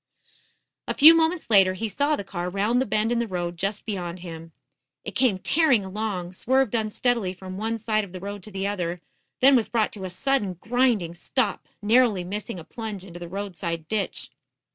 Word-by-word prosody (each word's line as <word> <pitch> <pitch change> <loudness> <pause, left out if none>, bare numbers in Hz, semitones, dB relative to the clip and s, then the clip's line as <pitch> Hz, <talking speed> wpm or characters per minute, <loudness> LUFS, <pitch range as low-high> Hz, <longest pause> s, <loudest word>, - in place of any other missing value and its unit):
A - - -2
few 315 +3 +10
moments 325 -4 +1
later 190 -3 +6
he 225 +4 -2
saw 285 +8 +1
the 200 - -5
car 180 -2 -4
round 210 +6 +1
the 265 - -1
bend 215 +2 +1
in 240 - +1
the 235 - -1
road 175 -3 -3
just 195 +4 -3
beyoud 180 -4 -4
him. 165 -2 -9 0.5
It - - -4
came 245 -8 +2
tearing 265 - +3
along, 190 -3 -4
swerved 260 +4 +1
unsteadily 220 -3 0
from 185 0 -8
one 225 +1 -1
side 215 -1 0
of 195 - -9
the 185 - -7
road 200 +2 -6
to 215 - -9
the 195 0 -3
other, 180 -4 -2 0.4
then 270 +1 +7
was 235 -4 +2
brought 225 -3 +1
to 200 - -8
a - - -4
sudden, 210 -1 0
grinding 220 -3 +1
stop, 205 +6 -1 0.2
narrowly 220 -3 +4
missing 205 +2 -5
a - - -9
plunge 215 -1 -6
into 175 -2 -10
the 175 -1 -8
roadside 175 -4 -4
ditch. 215 0 -3
205 Hz, 195 wpm, -25 LUFS, 185-235 Hz, 0.5 s, few